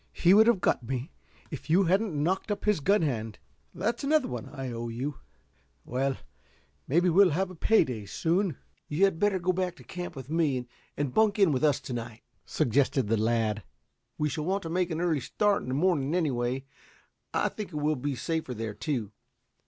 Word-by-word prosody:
"He 175 Hz, +2 st, +4 dB
would 220 Hz, +2 st, +7 dB
have 230 Hz, -6 st, +3 dB
got -, -, +2 dB
me 130 Hz, +5 st, -4 dB, 0.4 s
if 150 Hz, 0 st, -7 dB
you 180 Hz, +5 st, +5 dB
hadn't 190 Hz, 0 st, +1 dB
knocked 175 Hz, +9 st, 0 dB
up 205 Hz, -1 st, -3 dB
his 210 Hz, -5 st, +3 dB
gun 195 Hz, +5 st, +3 dB
hand. 115 Hz, -7 st, -2 dB, 0.3 s
That's 205 Hz, +10 st, -2 dB
another 295 Hz, -1 st, +3 dB
one 120 Hz, -3 st, -6 dB
I 135 Hz, -3 st, -5 dB
owe 120 Hz, 0 st, -4 dB
you. 130 Hz, +5 st, -4 dB, 0.7 s
Well, 135 Hz, +1 st, -1 dB, 0.7 s
maybe 170 Hz, +6 st, +3 dB
we'll 185 Hz, +2 st, +6 dB
have 185 Hz, +4 st, -1 dB
a -, -, -10 dB
pay 220 Hz, +6 st, +4 dB
day 110 Hz, -5 st, -6 dB
soon." 170 Hz, -, 0 dB, 0.3 s
"You 150 Hz, +6 st, 0 dB
had 190 Hz, -5 st, 0 dB
better 205 Hz, -1 st, +2 dB
go 185 Hz, +1 st, 0 dB
back 180 Hz, -1 st, -1 dB
to -, -, -15 dB
camp 180 Hz, -2 st, -6 dB
with 130 Hz, -2 st, -8 dB
me, 145 Hz, -5 st, 0 dB, 0.3 s
and 140 Hz, -3 st, -1 dB
bunk 220 Hz, -2 st, +3 dB
in 195 Hz, -6 st, +5 dB
with 135 Hz, +1 st, 0 dB
us 145 Hz, -2 st, +3 dB
to 130 Hz, -1 st, -6 dB
night," 115 Hz, -1 st, -6 dB, 0.2 s
suggested 130 Hz, -1 st, +1 dB
the 115 Hz, -, +3 dB
lad, 110 Hz, -1 st, +1 dB, 0.6 s
"We 150 Hz, -, +1 dB
shall 150 Hz, +1 st, -3 dB
want 195 Hz, +3 st, 0 dB
to 165 Hz, -, -5 dB
make 180 Hz, 0 st, +1 dB
an 165 Hz, 0 st, -2 dB
early 165 Hz, -4 st, +1 dB
start 205 Hz, +7 st, +1 dB
in -, -, -8 dB
the 130 Hz, -, -1 dB
morning, 155 Hz, -2 st, +1 dB
anyway. 130 Hz, -5 st, 0 dB, 0.7 s
I -, -, +1 dB
think 210 Hz, -2 st, -6 dB
it -, -, -9 dB
will 150 Hz, +1 st, +1 dB
be 140 Hz, +1 st, -3 dB
safer 155 Hz, 0 st, -3 dB
there, 110 Hz, -1 st, -4 dB
too. 120 Hz, -6 st, -3 dB
155 Hz, 200 wpm, -28 LUFS, 130-185 Hz, 0.7 s, would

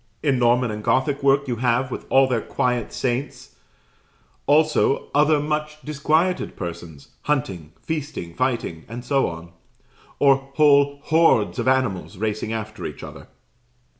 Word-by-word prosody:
In 135 Hz, -4 st, +2 dB
Norman 120 Hz, 0 st, +2 dB
and 105 Hz, 0 st, -6 dB
Gothic 130 Hz, +5 st, +1 dB
work 140 Hz, 0 st, +3 dB
you 120 Hz, -2 st, -2 dB
have, 125 Hz, +2 st, 0 dB
with -, -, -6 dB
all 135 Hz, 0 st, +5 dB
their 125 Hz, -3 st, 0 dB
quiet 125 Hz, -3 st, -1 dB
saints, 130 Hz, +1 st, -3 dB, 0.9 s
also 150 Hz, -1 st, +2 dB
other 150 Hz, +1 st, +4 dB
much 150 Hz, +1 st, -3 dB
disquieted 155 Hz, +5 st, 0 dB
persons, 85 Hz, -5 st, -8 dB, 0.2 s
hunting, 95 Hz, -, -2 dB
feasting, 145 Hz, -, -5 dB
fighting, 115 Hz, -10 st, -2 dB
and 120 Hz, +2 st, -8 dB
so 135 Hz, +1 st, +2 dB
on; 85 Hz, +1 st, -8 dB, 0.7 s
or 140 Hz, -2 st, +5 dB, 0.2 s
whole 140 Hz, -2 st, +4 dB
hordes 160 Hz, -10 st, +3 dB
of -, -, -2 dB
animals 130 Hz, -7 st, 0 dB
racing 110 Hz, +1 st, -2 dB
after 110 Hz, -1 st, -5 dB
each -, -, -10 dB
other. -, -, -10 dB
130 Hz, 135 wpm, -22 LUFS, 110-145 Hz, 0.9 s, all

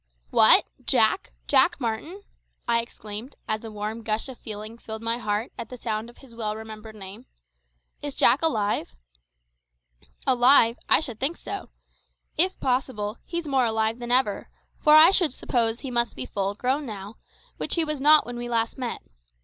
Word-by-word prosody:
"What! -, -, +7 dB, 0.2 s
Jack -, -, +2 dB
Jack -, -, +3 dB
Martin?" 275 Hz, -, -4 dB, 0.4 s
I 235 Hz, 0 st, +3 dB
exclaimed, 225 Hz, +2 st, -8 dB
as 215 Hz, +1 st, -2 dB
a 225 Hz, -, -6 dB
warm 215 Hz, +2 st, -5 dB
gush 220 Hz, +2 st, -1 dB
of 255 Hz, -, -10 dB
feeling 215 Hz, +1 st, -8 dB
filled 220 Hz, -1 st, -8 dB
my 230 Hz, +1 st, -1 dB
heart 210 Hz, +1 st, -2 dB
at 230 Hz, -1 st, -6 dB
the 250 Hz, -, -8 dB
sound 225 Hz, -1 st, -3 dB
of 240 Hz, -, -17 dB
his 265 Hz, -4 st, -16 dB
well 215 Hz, -2 st, -3 dB
remembered 220 Hz, 0 st, -9 dB
name. 205 Hz, +4 st, -11 dB, 0.7 s
"Is 290 Hz, -2 st, -5 dB
Jack 245 Hz, +4 st, +4 dB
alive?" 210 Hz, -, 0 dB, 1.3 s
"Alive! 245 Hz, -2 st, +5 dB
I -, -, +6 dB
should 245 Hz, -8 st, -4 dB
think 300 Hz, +6 st, 0 dB
so. 400 Hz, -, -7 dB, 0.7 s
If 370 Hz, +4 st, +2 dB
possible, 250 Hz, -5 st, -2 dB
he's 340 Hz, -2 st, -4 dB
more 265 Hz, -3 st, +2 dB
alive 220 Hz, +1 st, 0 dB
than 240 Hz, 0 st, -5 dB
ever; 250 Hz, -5 st, +1 dB, 0.3 s
for 300 Hz, -1 st, +6 dB
I 320 Hz, +4 st, +9 dB
should 345 Hz, -8 st, +2 dB
suppose 235 Hz, -3 st, 0 dB
he 270 Hz, -, -6 dB
must 235 Hz, -1 st, 0 dB
be -, -, -4 dB
full 200 Hz, 0 st, -3 dB
grown 265 Hz, +5 st, -1 dB
now, 205 Hz, 0 st, -8 dB, 0.4 s
which -, -, -1 dB
he 335 Hz, -2 st, +2 dB
was 305 Hz, -3 st, -2 dB
not 300 Hz, +1 st, +6 dB
when 245 Hz, 0 st, -6 dB
we 240 Hz, 0 st, -5 dB
last 230 Hz, +2 st, -1 dB
met. 245 Hz, -2 st, -4 dB
235 Hz, 175 wpm, -25 LUFS, 220-265 Hz, 1.3 s, I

